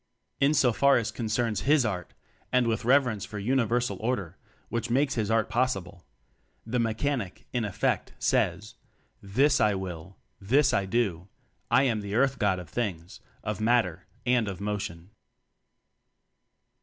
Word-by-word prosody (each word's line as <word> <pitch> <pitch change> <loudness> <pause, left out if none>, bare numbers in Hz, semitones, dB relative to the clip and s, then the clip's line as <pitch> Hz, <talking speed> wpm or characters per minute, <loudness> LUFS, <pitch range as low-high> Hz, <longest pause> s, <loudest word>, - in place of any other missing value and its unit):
In 140 +2 +3
so 125 -4 +4
far 140 +6 +4
as 115 -2 -1
concerns 110 -1 -1
his 145 -2 +3
art 90 -5 -4 0.4
(and 125 -1 +3
with 115 0 -1
reverence 125 -5 +3
for 105 - -7
Uni 120 +4 +1
versal 120 -3 0
Order, 100 -7 -2 0.3
which 115 0 -2
makes 135 +3 +2
his 110 -3 -1
art 115 -1 +2
pos 130 +1 +1
sible) 90 -2 -9 0.6
the 120 +2 -1
Mechanic, 115 -2 -2
in 120 -2 0
effect, 105 -3 -1
says: 110 +3 0 0.5
"This 135 +8 +2
I 105 -2 +3
will," 95 -1 -7 0.2
"Thus 135 +8 +3
I 100 - +1
do." 95 -5 -1 0.4
"I - - +5
am 115 -5 +1
the 100 0 -4
Earth 135 +2 +2
god 100 -3 +2
of 90 -2 -8
things, 90 -3 -4 0.2
of 105 0 -3
matter, 110 -7 +1 0.2
and 120 -3 +2
of 95 -3 -5
motion." 100 -3 -4
110 Hz, 155 wpm, -27 LUFS, 100-125 Hz, 0.6 s, I